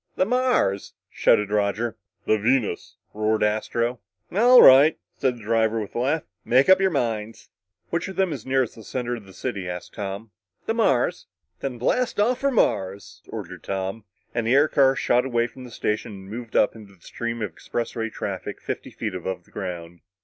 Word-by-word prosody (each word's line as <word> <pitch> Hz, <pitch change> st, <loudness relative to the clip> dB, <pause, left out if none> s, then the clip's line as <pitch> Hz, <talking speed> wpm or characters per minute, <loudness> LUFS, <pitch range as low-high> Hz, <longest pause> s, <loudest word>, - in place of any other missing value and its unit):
"The 185 Hz, -, +2 dB
Mars," 245 Hz, -, +1 dB, 0.2 s
shouted 105 Hz, -1 st, +3 dB
Roger. 105 Hz, +2 st, 0 dB, 0.3 s
"The 110 Hz, -, +2 dB
Venus!" 105 Hz, -6 st, 0 dB, 0.2 s
roared 110 Hz, 0 st, +1 dB
Astro. 115 Hz, +3 st, 0 dB, 0.3 s
"All 245 Hz, +6 st, +7 dB
right," 140 Hz, +4 st, +8 dB, 0.2 s
said 130 Hz, -2 st, +1 dB
the 115 Hz, -, -13 dB
driver 110 Hz, +1 st, +1 dB
with 105 Hz, -2 st, -6 dB
a -, -, -2 dB
laugh, 145 Hz, +6 st, +1 dB, 0.2 s
"make 130 Hz, +7 st, +3 dB
up 190 Hz, 0 st, +7 dB
your 190 Hz, -, +4 dB
minds." 115 Hz, -, -3 dB, 0.4 s
"Which 170 Hz, -, -1 dB
of 190 Hz, 0 st, -7 dB
'em 190 Hz, -4 st, +2 dB
is 130 Hz, -7 st, -7 dB
nearest 130 Hz, -3 st, 0 dB
the 110 Hz, -, -13 dB
center 120 Hz, +1 st, -3 dB
of 105 Hz, -, -12 dB
the 95 Hz, -, -14 dB
city?" 100 Hz, -1 st, -4 dB
Tom -, -, -2 dB
asked. 95 Hz, +1 st, -8 dB
"The 225 Hz, -, 0 dB
Mars." 140 Hz, -, +1 dB, 0.3 s
"Then 130 Hz, -3 st, -4 dB
blast 230 Hz, -, 0 dB
off 240 Hz, +4 st, +2 dB
for 275 Hz, -, +2 dB
Mars!" 100 Hz, -, -1 dB
ordered -, -, -7 dB
Tom, 95 Hz, +2 st, -4 dB, 0.3 s
and 115 Hz, -1 st, -1 dB
the 125 Hz, -, +4 dB
air 145 Hz, +2 st, +5 dB
car 135 Hz, -2 st, +4 dB
shot 125 Hz, -1 st, +2 dB
away 120 Hz, -3 st, +1 dB
from 125 Hz, +1 st, -10 dB
the -, -, -10 dB
station 110 Hz, 0 st, -2 dB
and 95 Hz, 0 st, -11 dB
moved 115 Hz, 0 st, -7 dB
up 105 Hz, -, +3 dB
into 105 Hz, -3 st, -13 dB
the 85 Hz, -, -31 dB
stream 115 Hz, +3 st, -4 dB
of 100 Hz, -6 st, -4 dB
expressway 115 Hz, +3 st, -4 dB
traffic -, -, -5 dB
fifty -, -, -5 dB
feet 110 Hz, -4 st, -5 dB
above 90 Hz, 0 st, -4 dB
the -, -, -26 dB
ground. 85 Hz, -3 st, -6 dB
115 Hz, 190 wpm, -24 LUFS, 100-135 Hz, 0.4 s, right